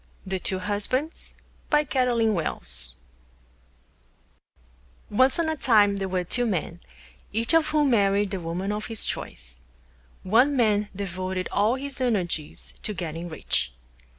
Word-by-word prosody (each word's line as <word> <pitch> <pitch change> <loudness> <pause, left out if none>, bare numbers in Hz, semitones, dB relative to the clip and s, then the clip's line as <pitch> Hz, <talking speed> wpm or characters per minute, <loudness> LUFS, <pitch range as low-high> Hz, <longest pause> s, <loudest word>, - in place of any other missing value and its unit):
THE 190 -1 -2
TWO 190 -1 -2
HUSBANDS 210 - -2 0.3
BY 300 0 +4
CAROLYN 245 -5 +2
WELLS 65 - -3 2.2
Once 260 +5 +4
on 335 -1 +1
a 315 - 0
Time 210 -7 +4
there 195 -1 -2
were 185 -1 0
Two 245 +7 0
Men, 175 -4 -2 0.5
each 230 +7 +1
of 325 -1 +5
whom 300 -3 +2
married 200 -2 +3
the 195 - -2
Woman 175 +4 -3
of 210 0 -3
his 225 -3 +2
Choice. - - -6 0.6
One 250 +9 +4
Man 210 -3 +2
devoted 185 -1 -3
all 210 +4 +3
his 275 0 -5
Energies 180 -11 -1
to 210 - -3
Getting 170 0 -4
Rich. 155 - -1
205 Hz, 135 wpm, -26 LUFS, 185-250 Hz, 2.2 s, of